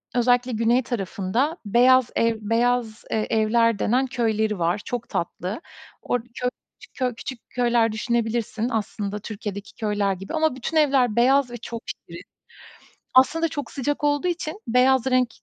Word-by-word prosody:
özellikle 245 +1 +3
güney 230 +3 +2
tarafında 235 - -1
beyaz 250 +3 +5
ev 230 0 +2
beyaz, 230 +1 0
eee, 215 -1 0
evler 225 0 +2
denen 255 +4 +2
köyleri 220 -5 0
var, 175 +4 0
çok 245 -2 -4
tatlı. 185 - -3 0.4
Orada 245 -1 -2
köy 250 -1 -1 0.4
köy 250 -3 -1
küçük 250 +1 -7
köyler 240 -2 +2
düşünebilirsin 230 0 -1
aslında 210 -2 -3
Türkiye'deki 205 -1 -7
köyler 205 -2 0
gibi 195 +1 -8
ama 315 -3 +1
bütün 265 +5 -3
evler 270 -7 +3
beyaz 260 +2 +4
ve 240 - -6
çok 230 0 -7
şirin. - - -8 0.9
Aslında 320 +6 +4
çok 290 -1 -5
sıcak 290 +2 -2
olduğu 290 +4 +2
için 345 +2 -3
beyaz 255 +1 +4
renk, 255 -1 +3
240 Hz, 145 wpm, -24 LUFS, 215-260 Hz, 0.9 s, beyaz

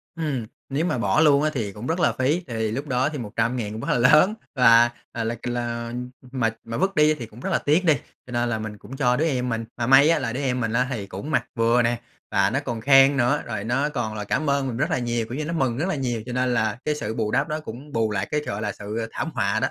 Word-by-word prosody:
Ừm, 145 -8 -2 0.2
nếu 145 +5 0
mà 130 - 0
bỏ 155 +6 +2
luôn 145 -2 +5
á, 155 - +2
thì 110 -7 -2
cũng 105 +5 -7
rất 165 +3 -1
là - - +3
phí. 150 +7 0
Thì 110 -2 -2
lúc 140 +5 -4
đó 130 +2 +1
thì 150 - -6
100.000 115 -1 -2
cũng 110 - -6
hơi 125 - 0
lớn, 155 - +6 0.2
là, 120 -1 +6 0.2
ờ, 115 - -3
là 115 +1 -2
c 120 - -8
là, 120 -1 -3
ừm, 125 +1 -5 0.2
mà 120 -4 +1
mà 115 0 -5
vứt 195 +1 0
đi 150 0 +5
thì 125 -6 -6
cũng 110 +2 -15
rất - - -4
là - - +2
tiếc 160 +6 +2
đi, 155 - +6 0.3
cho - - -10
nên 120 0 0
là 110 -2 -1
mình 110 -1 -6
cũng 135 +6 -10
cho 125 -3 +3
đứa 155 - +1
em 125 -5 0
mình. 115 -1 -2
Mà 120 0 -1
may 135 +4 +7
á, 165 - +3
là 120 -3 -3
đứa 135 - -3
em 125 -2 0
mình 115 -2 -1
á, 125 +1 +2
thì 105 -6 -4
cũng 100 +12 -6
mặc - - +1
vừa 115 +1 +3
nè, 120 0 0 0.3
và 100 0 +3
nó 135 +4 0
còn 120 -6 -4
khen 135 +1 +6
nữa, 130 +4 +2
rồi 110 -3 -4
nó 135 +6 0
còn 120 -6 -3
là 105 - -4
cảm 140 +8 -1
ơn 140 -1 +1
mình 120 -2 -4
rất - - 0
là - - +1
nhiều, 120 -1 -1
kiểu 120 +5 -6
như 155 - -2
nó 165 - -3
mừng 130 -6 0
rất 170 +6 -1
là 190 - 0
nhiều, 120 -5 -2
cho 125 - -5
nên 125 -1 +1
là 110 -1 0
cái 150 -1 +1
sự 110 -6 -4
bù 110 -2 -1
đắp 150 +6 +1
nó 155 +1 -2
cũng 140 +1 -9
bù 110 -2 +1
lại 105 - -1
cái, 150 0 +1
gọi 100 +2 -4
là, 105 -1 -1
sự, 105 +2 -6
ờ, 115 - -3
thảm 160 - -3
họa 100 +3 0
đó. - - +1
125 Hz, 300 wpm, -24 LUFS, 115-140 Hz, 0.3 s, may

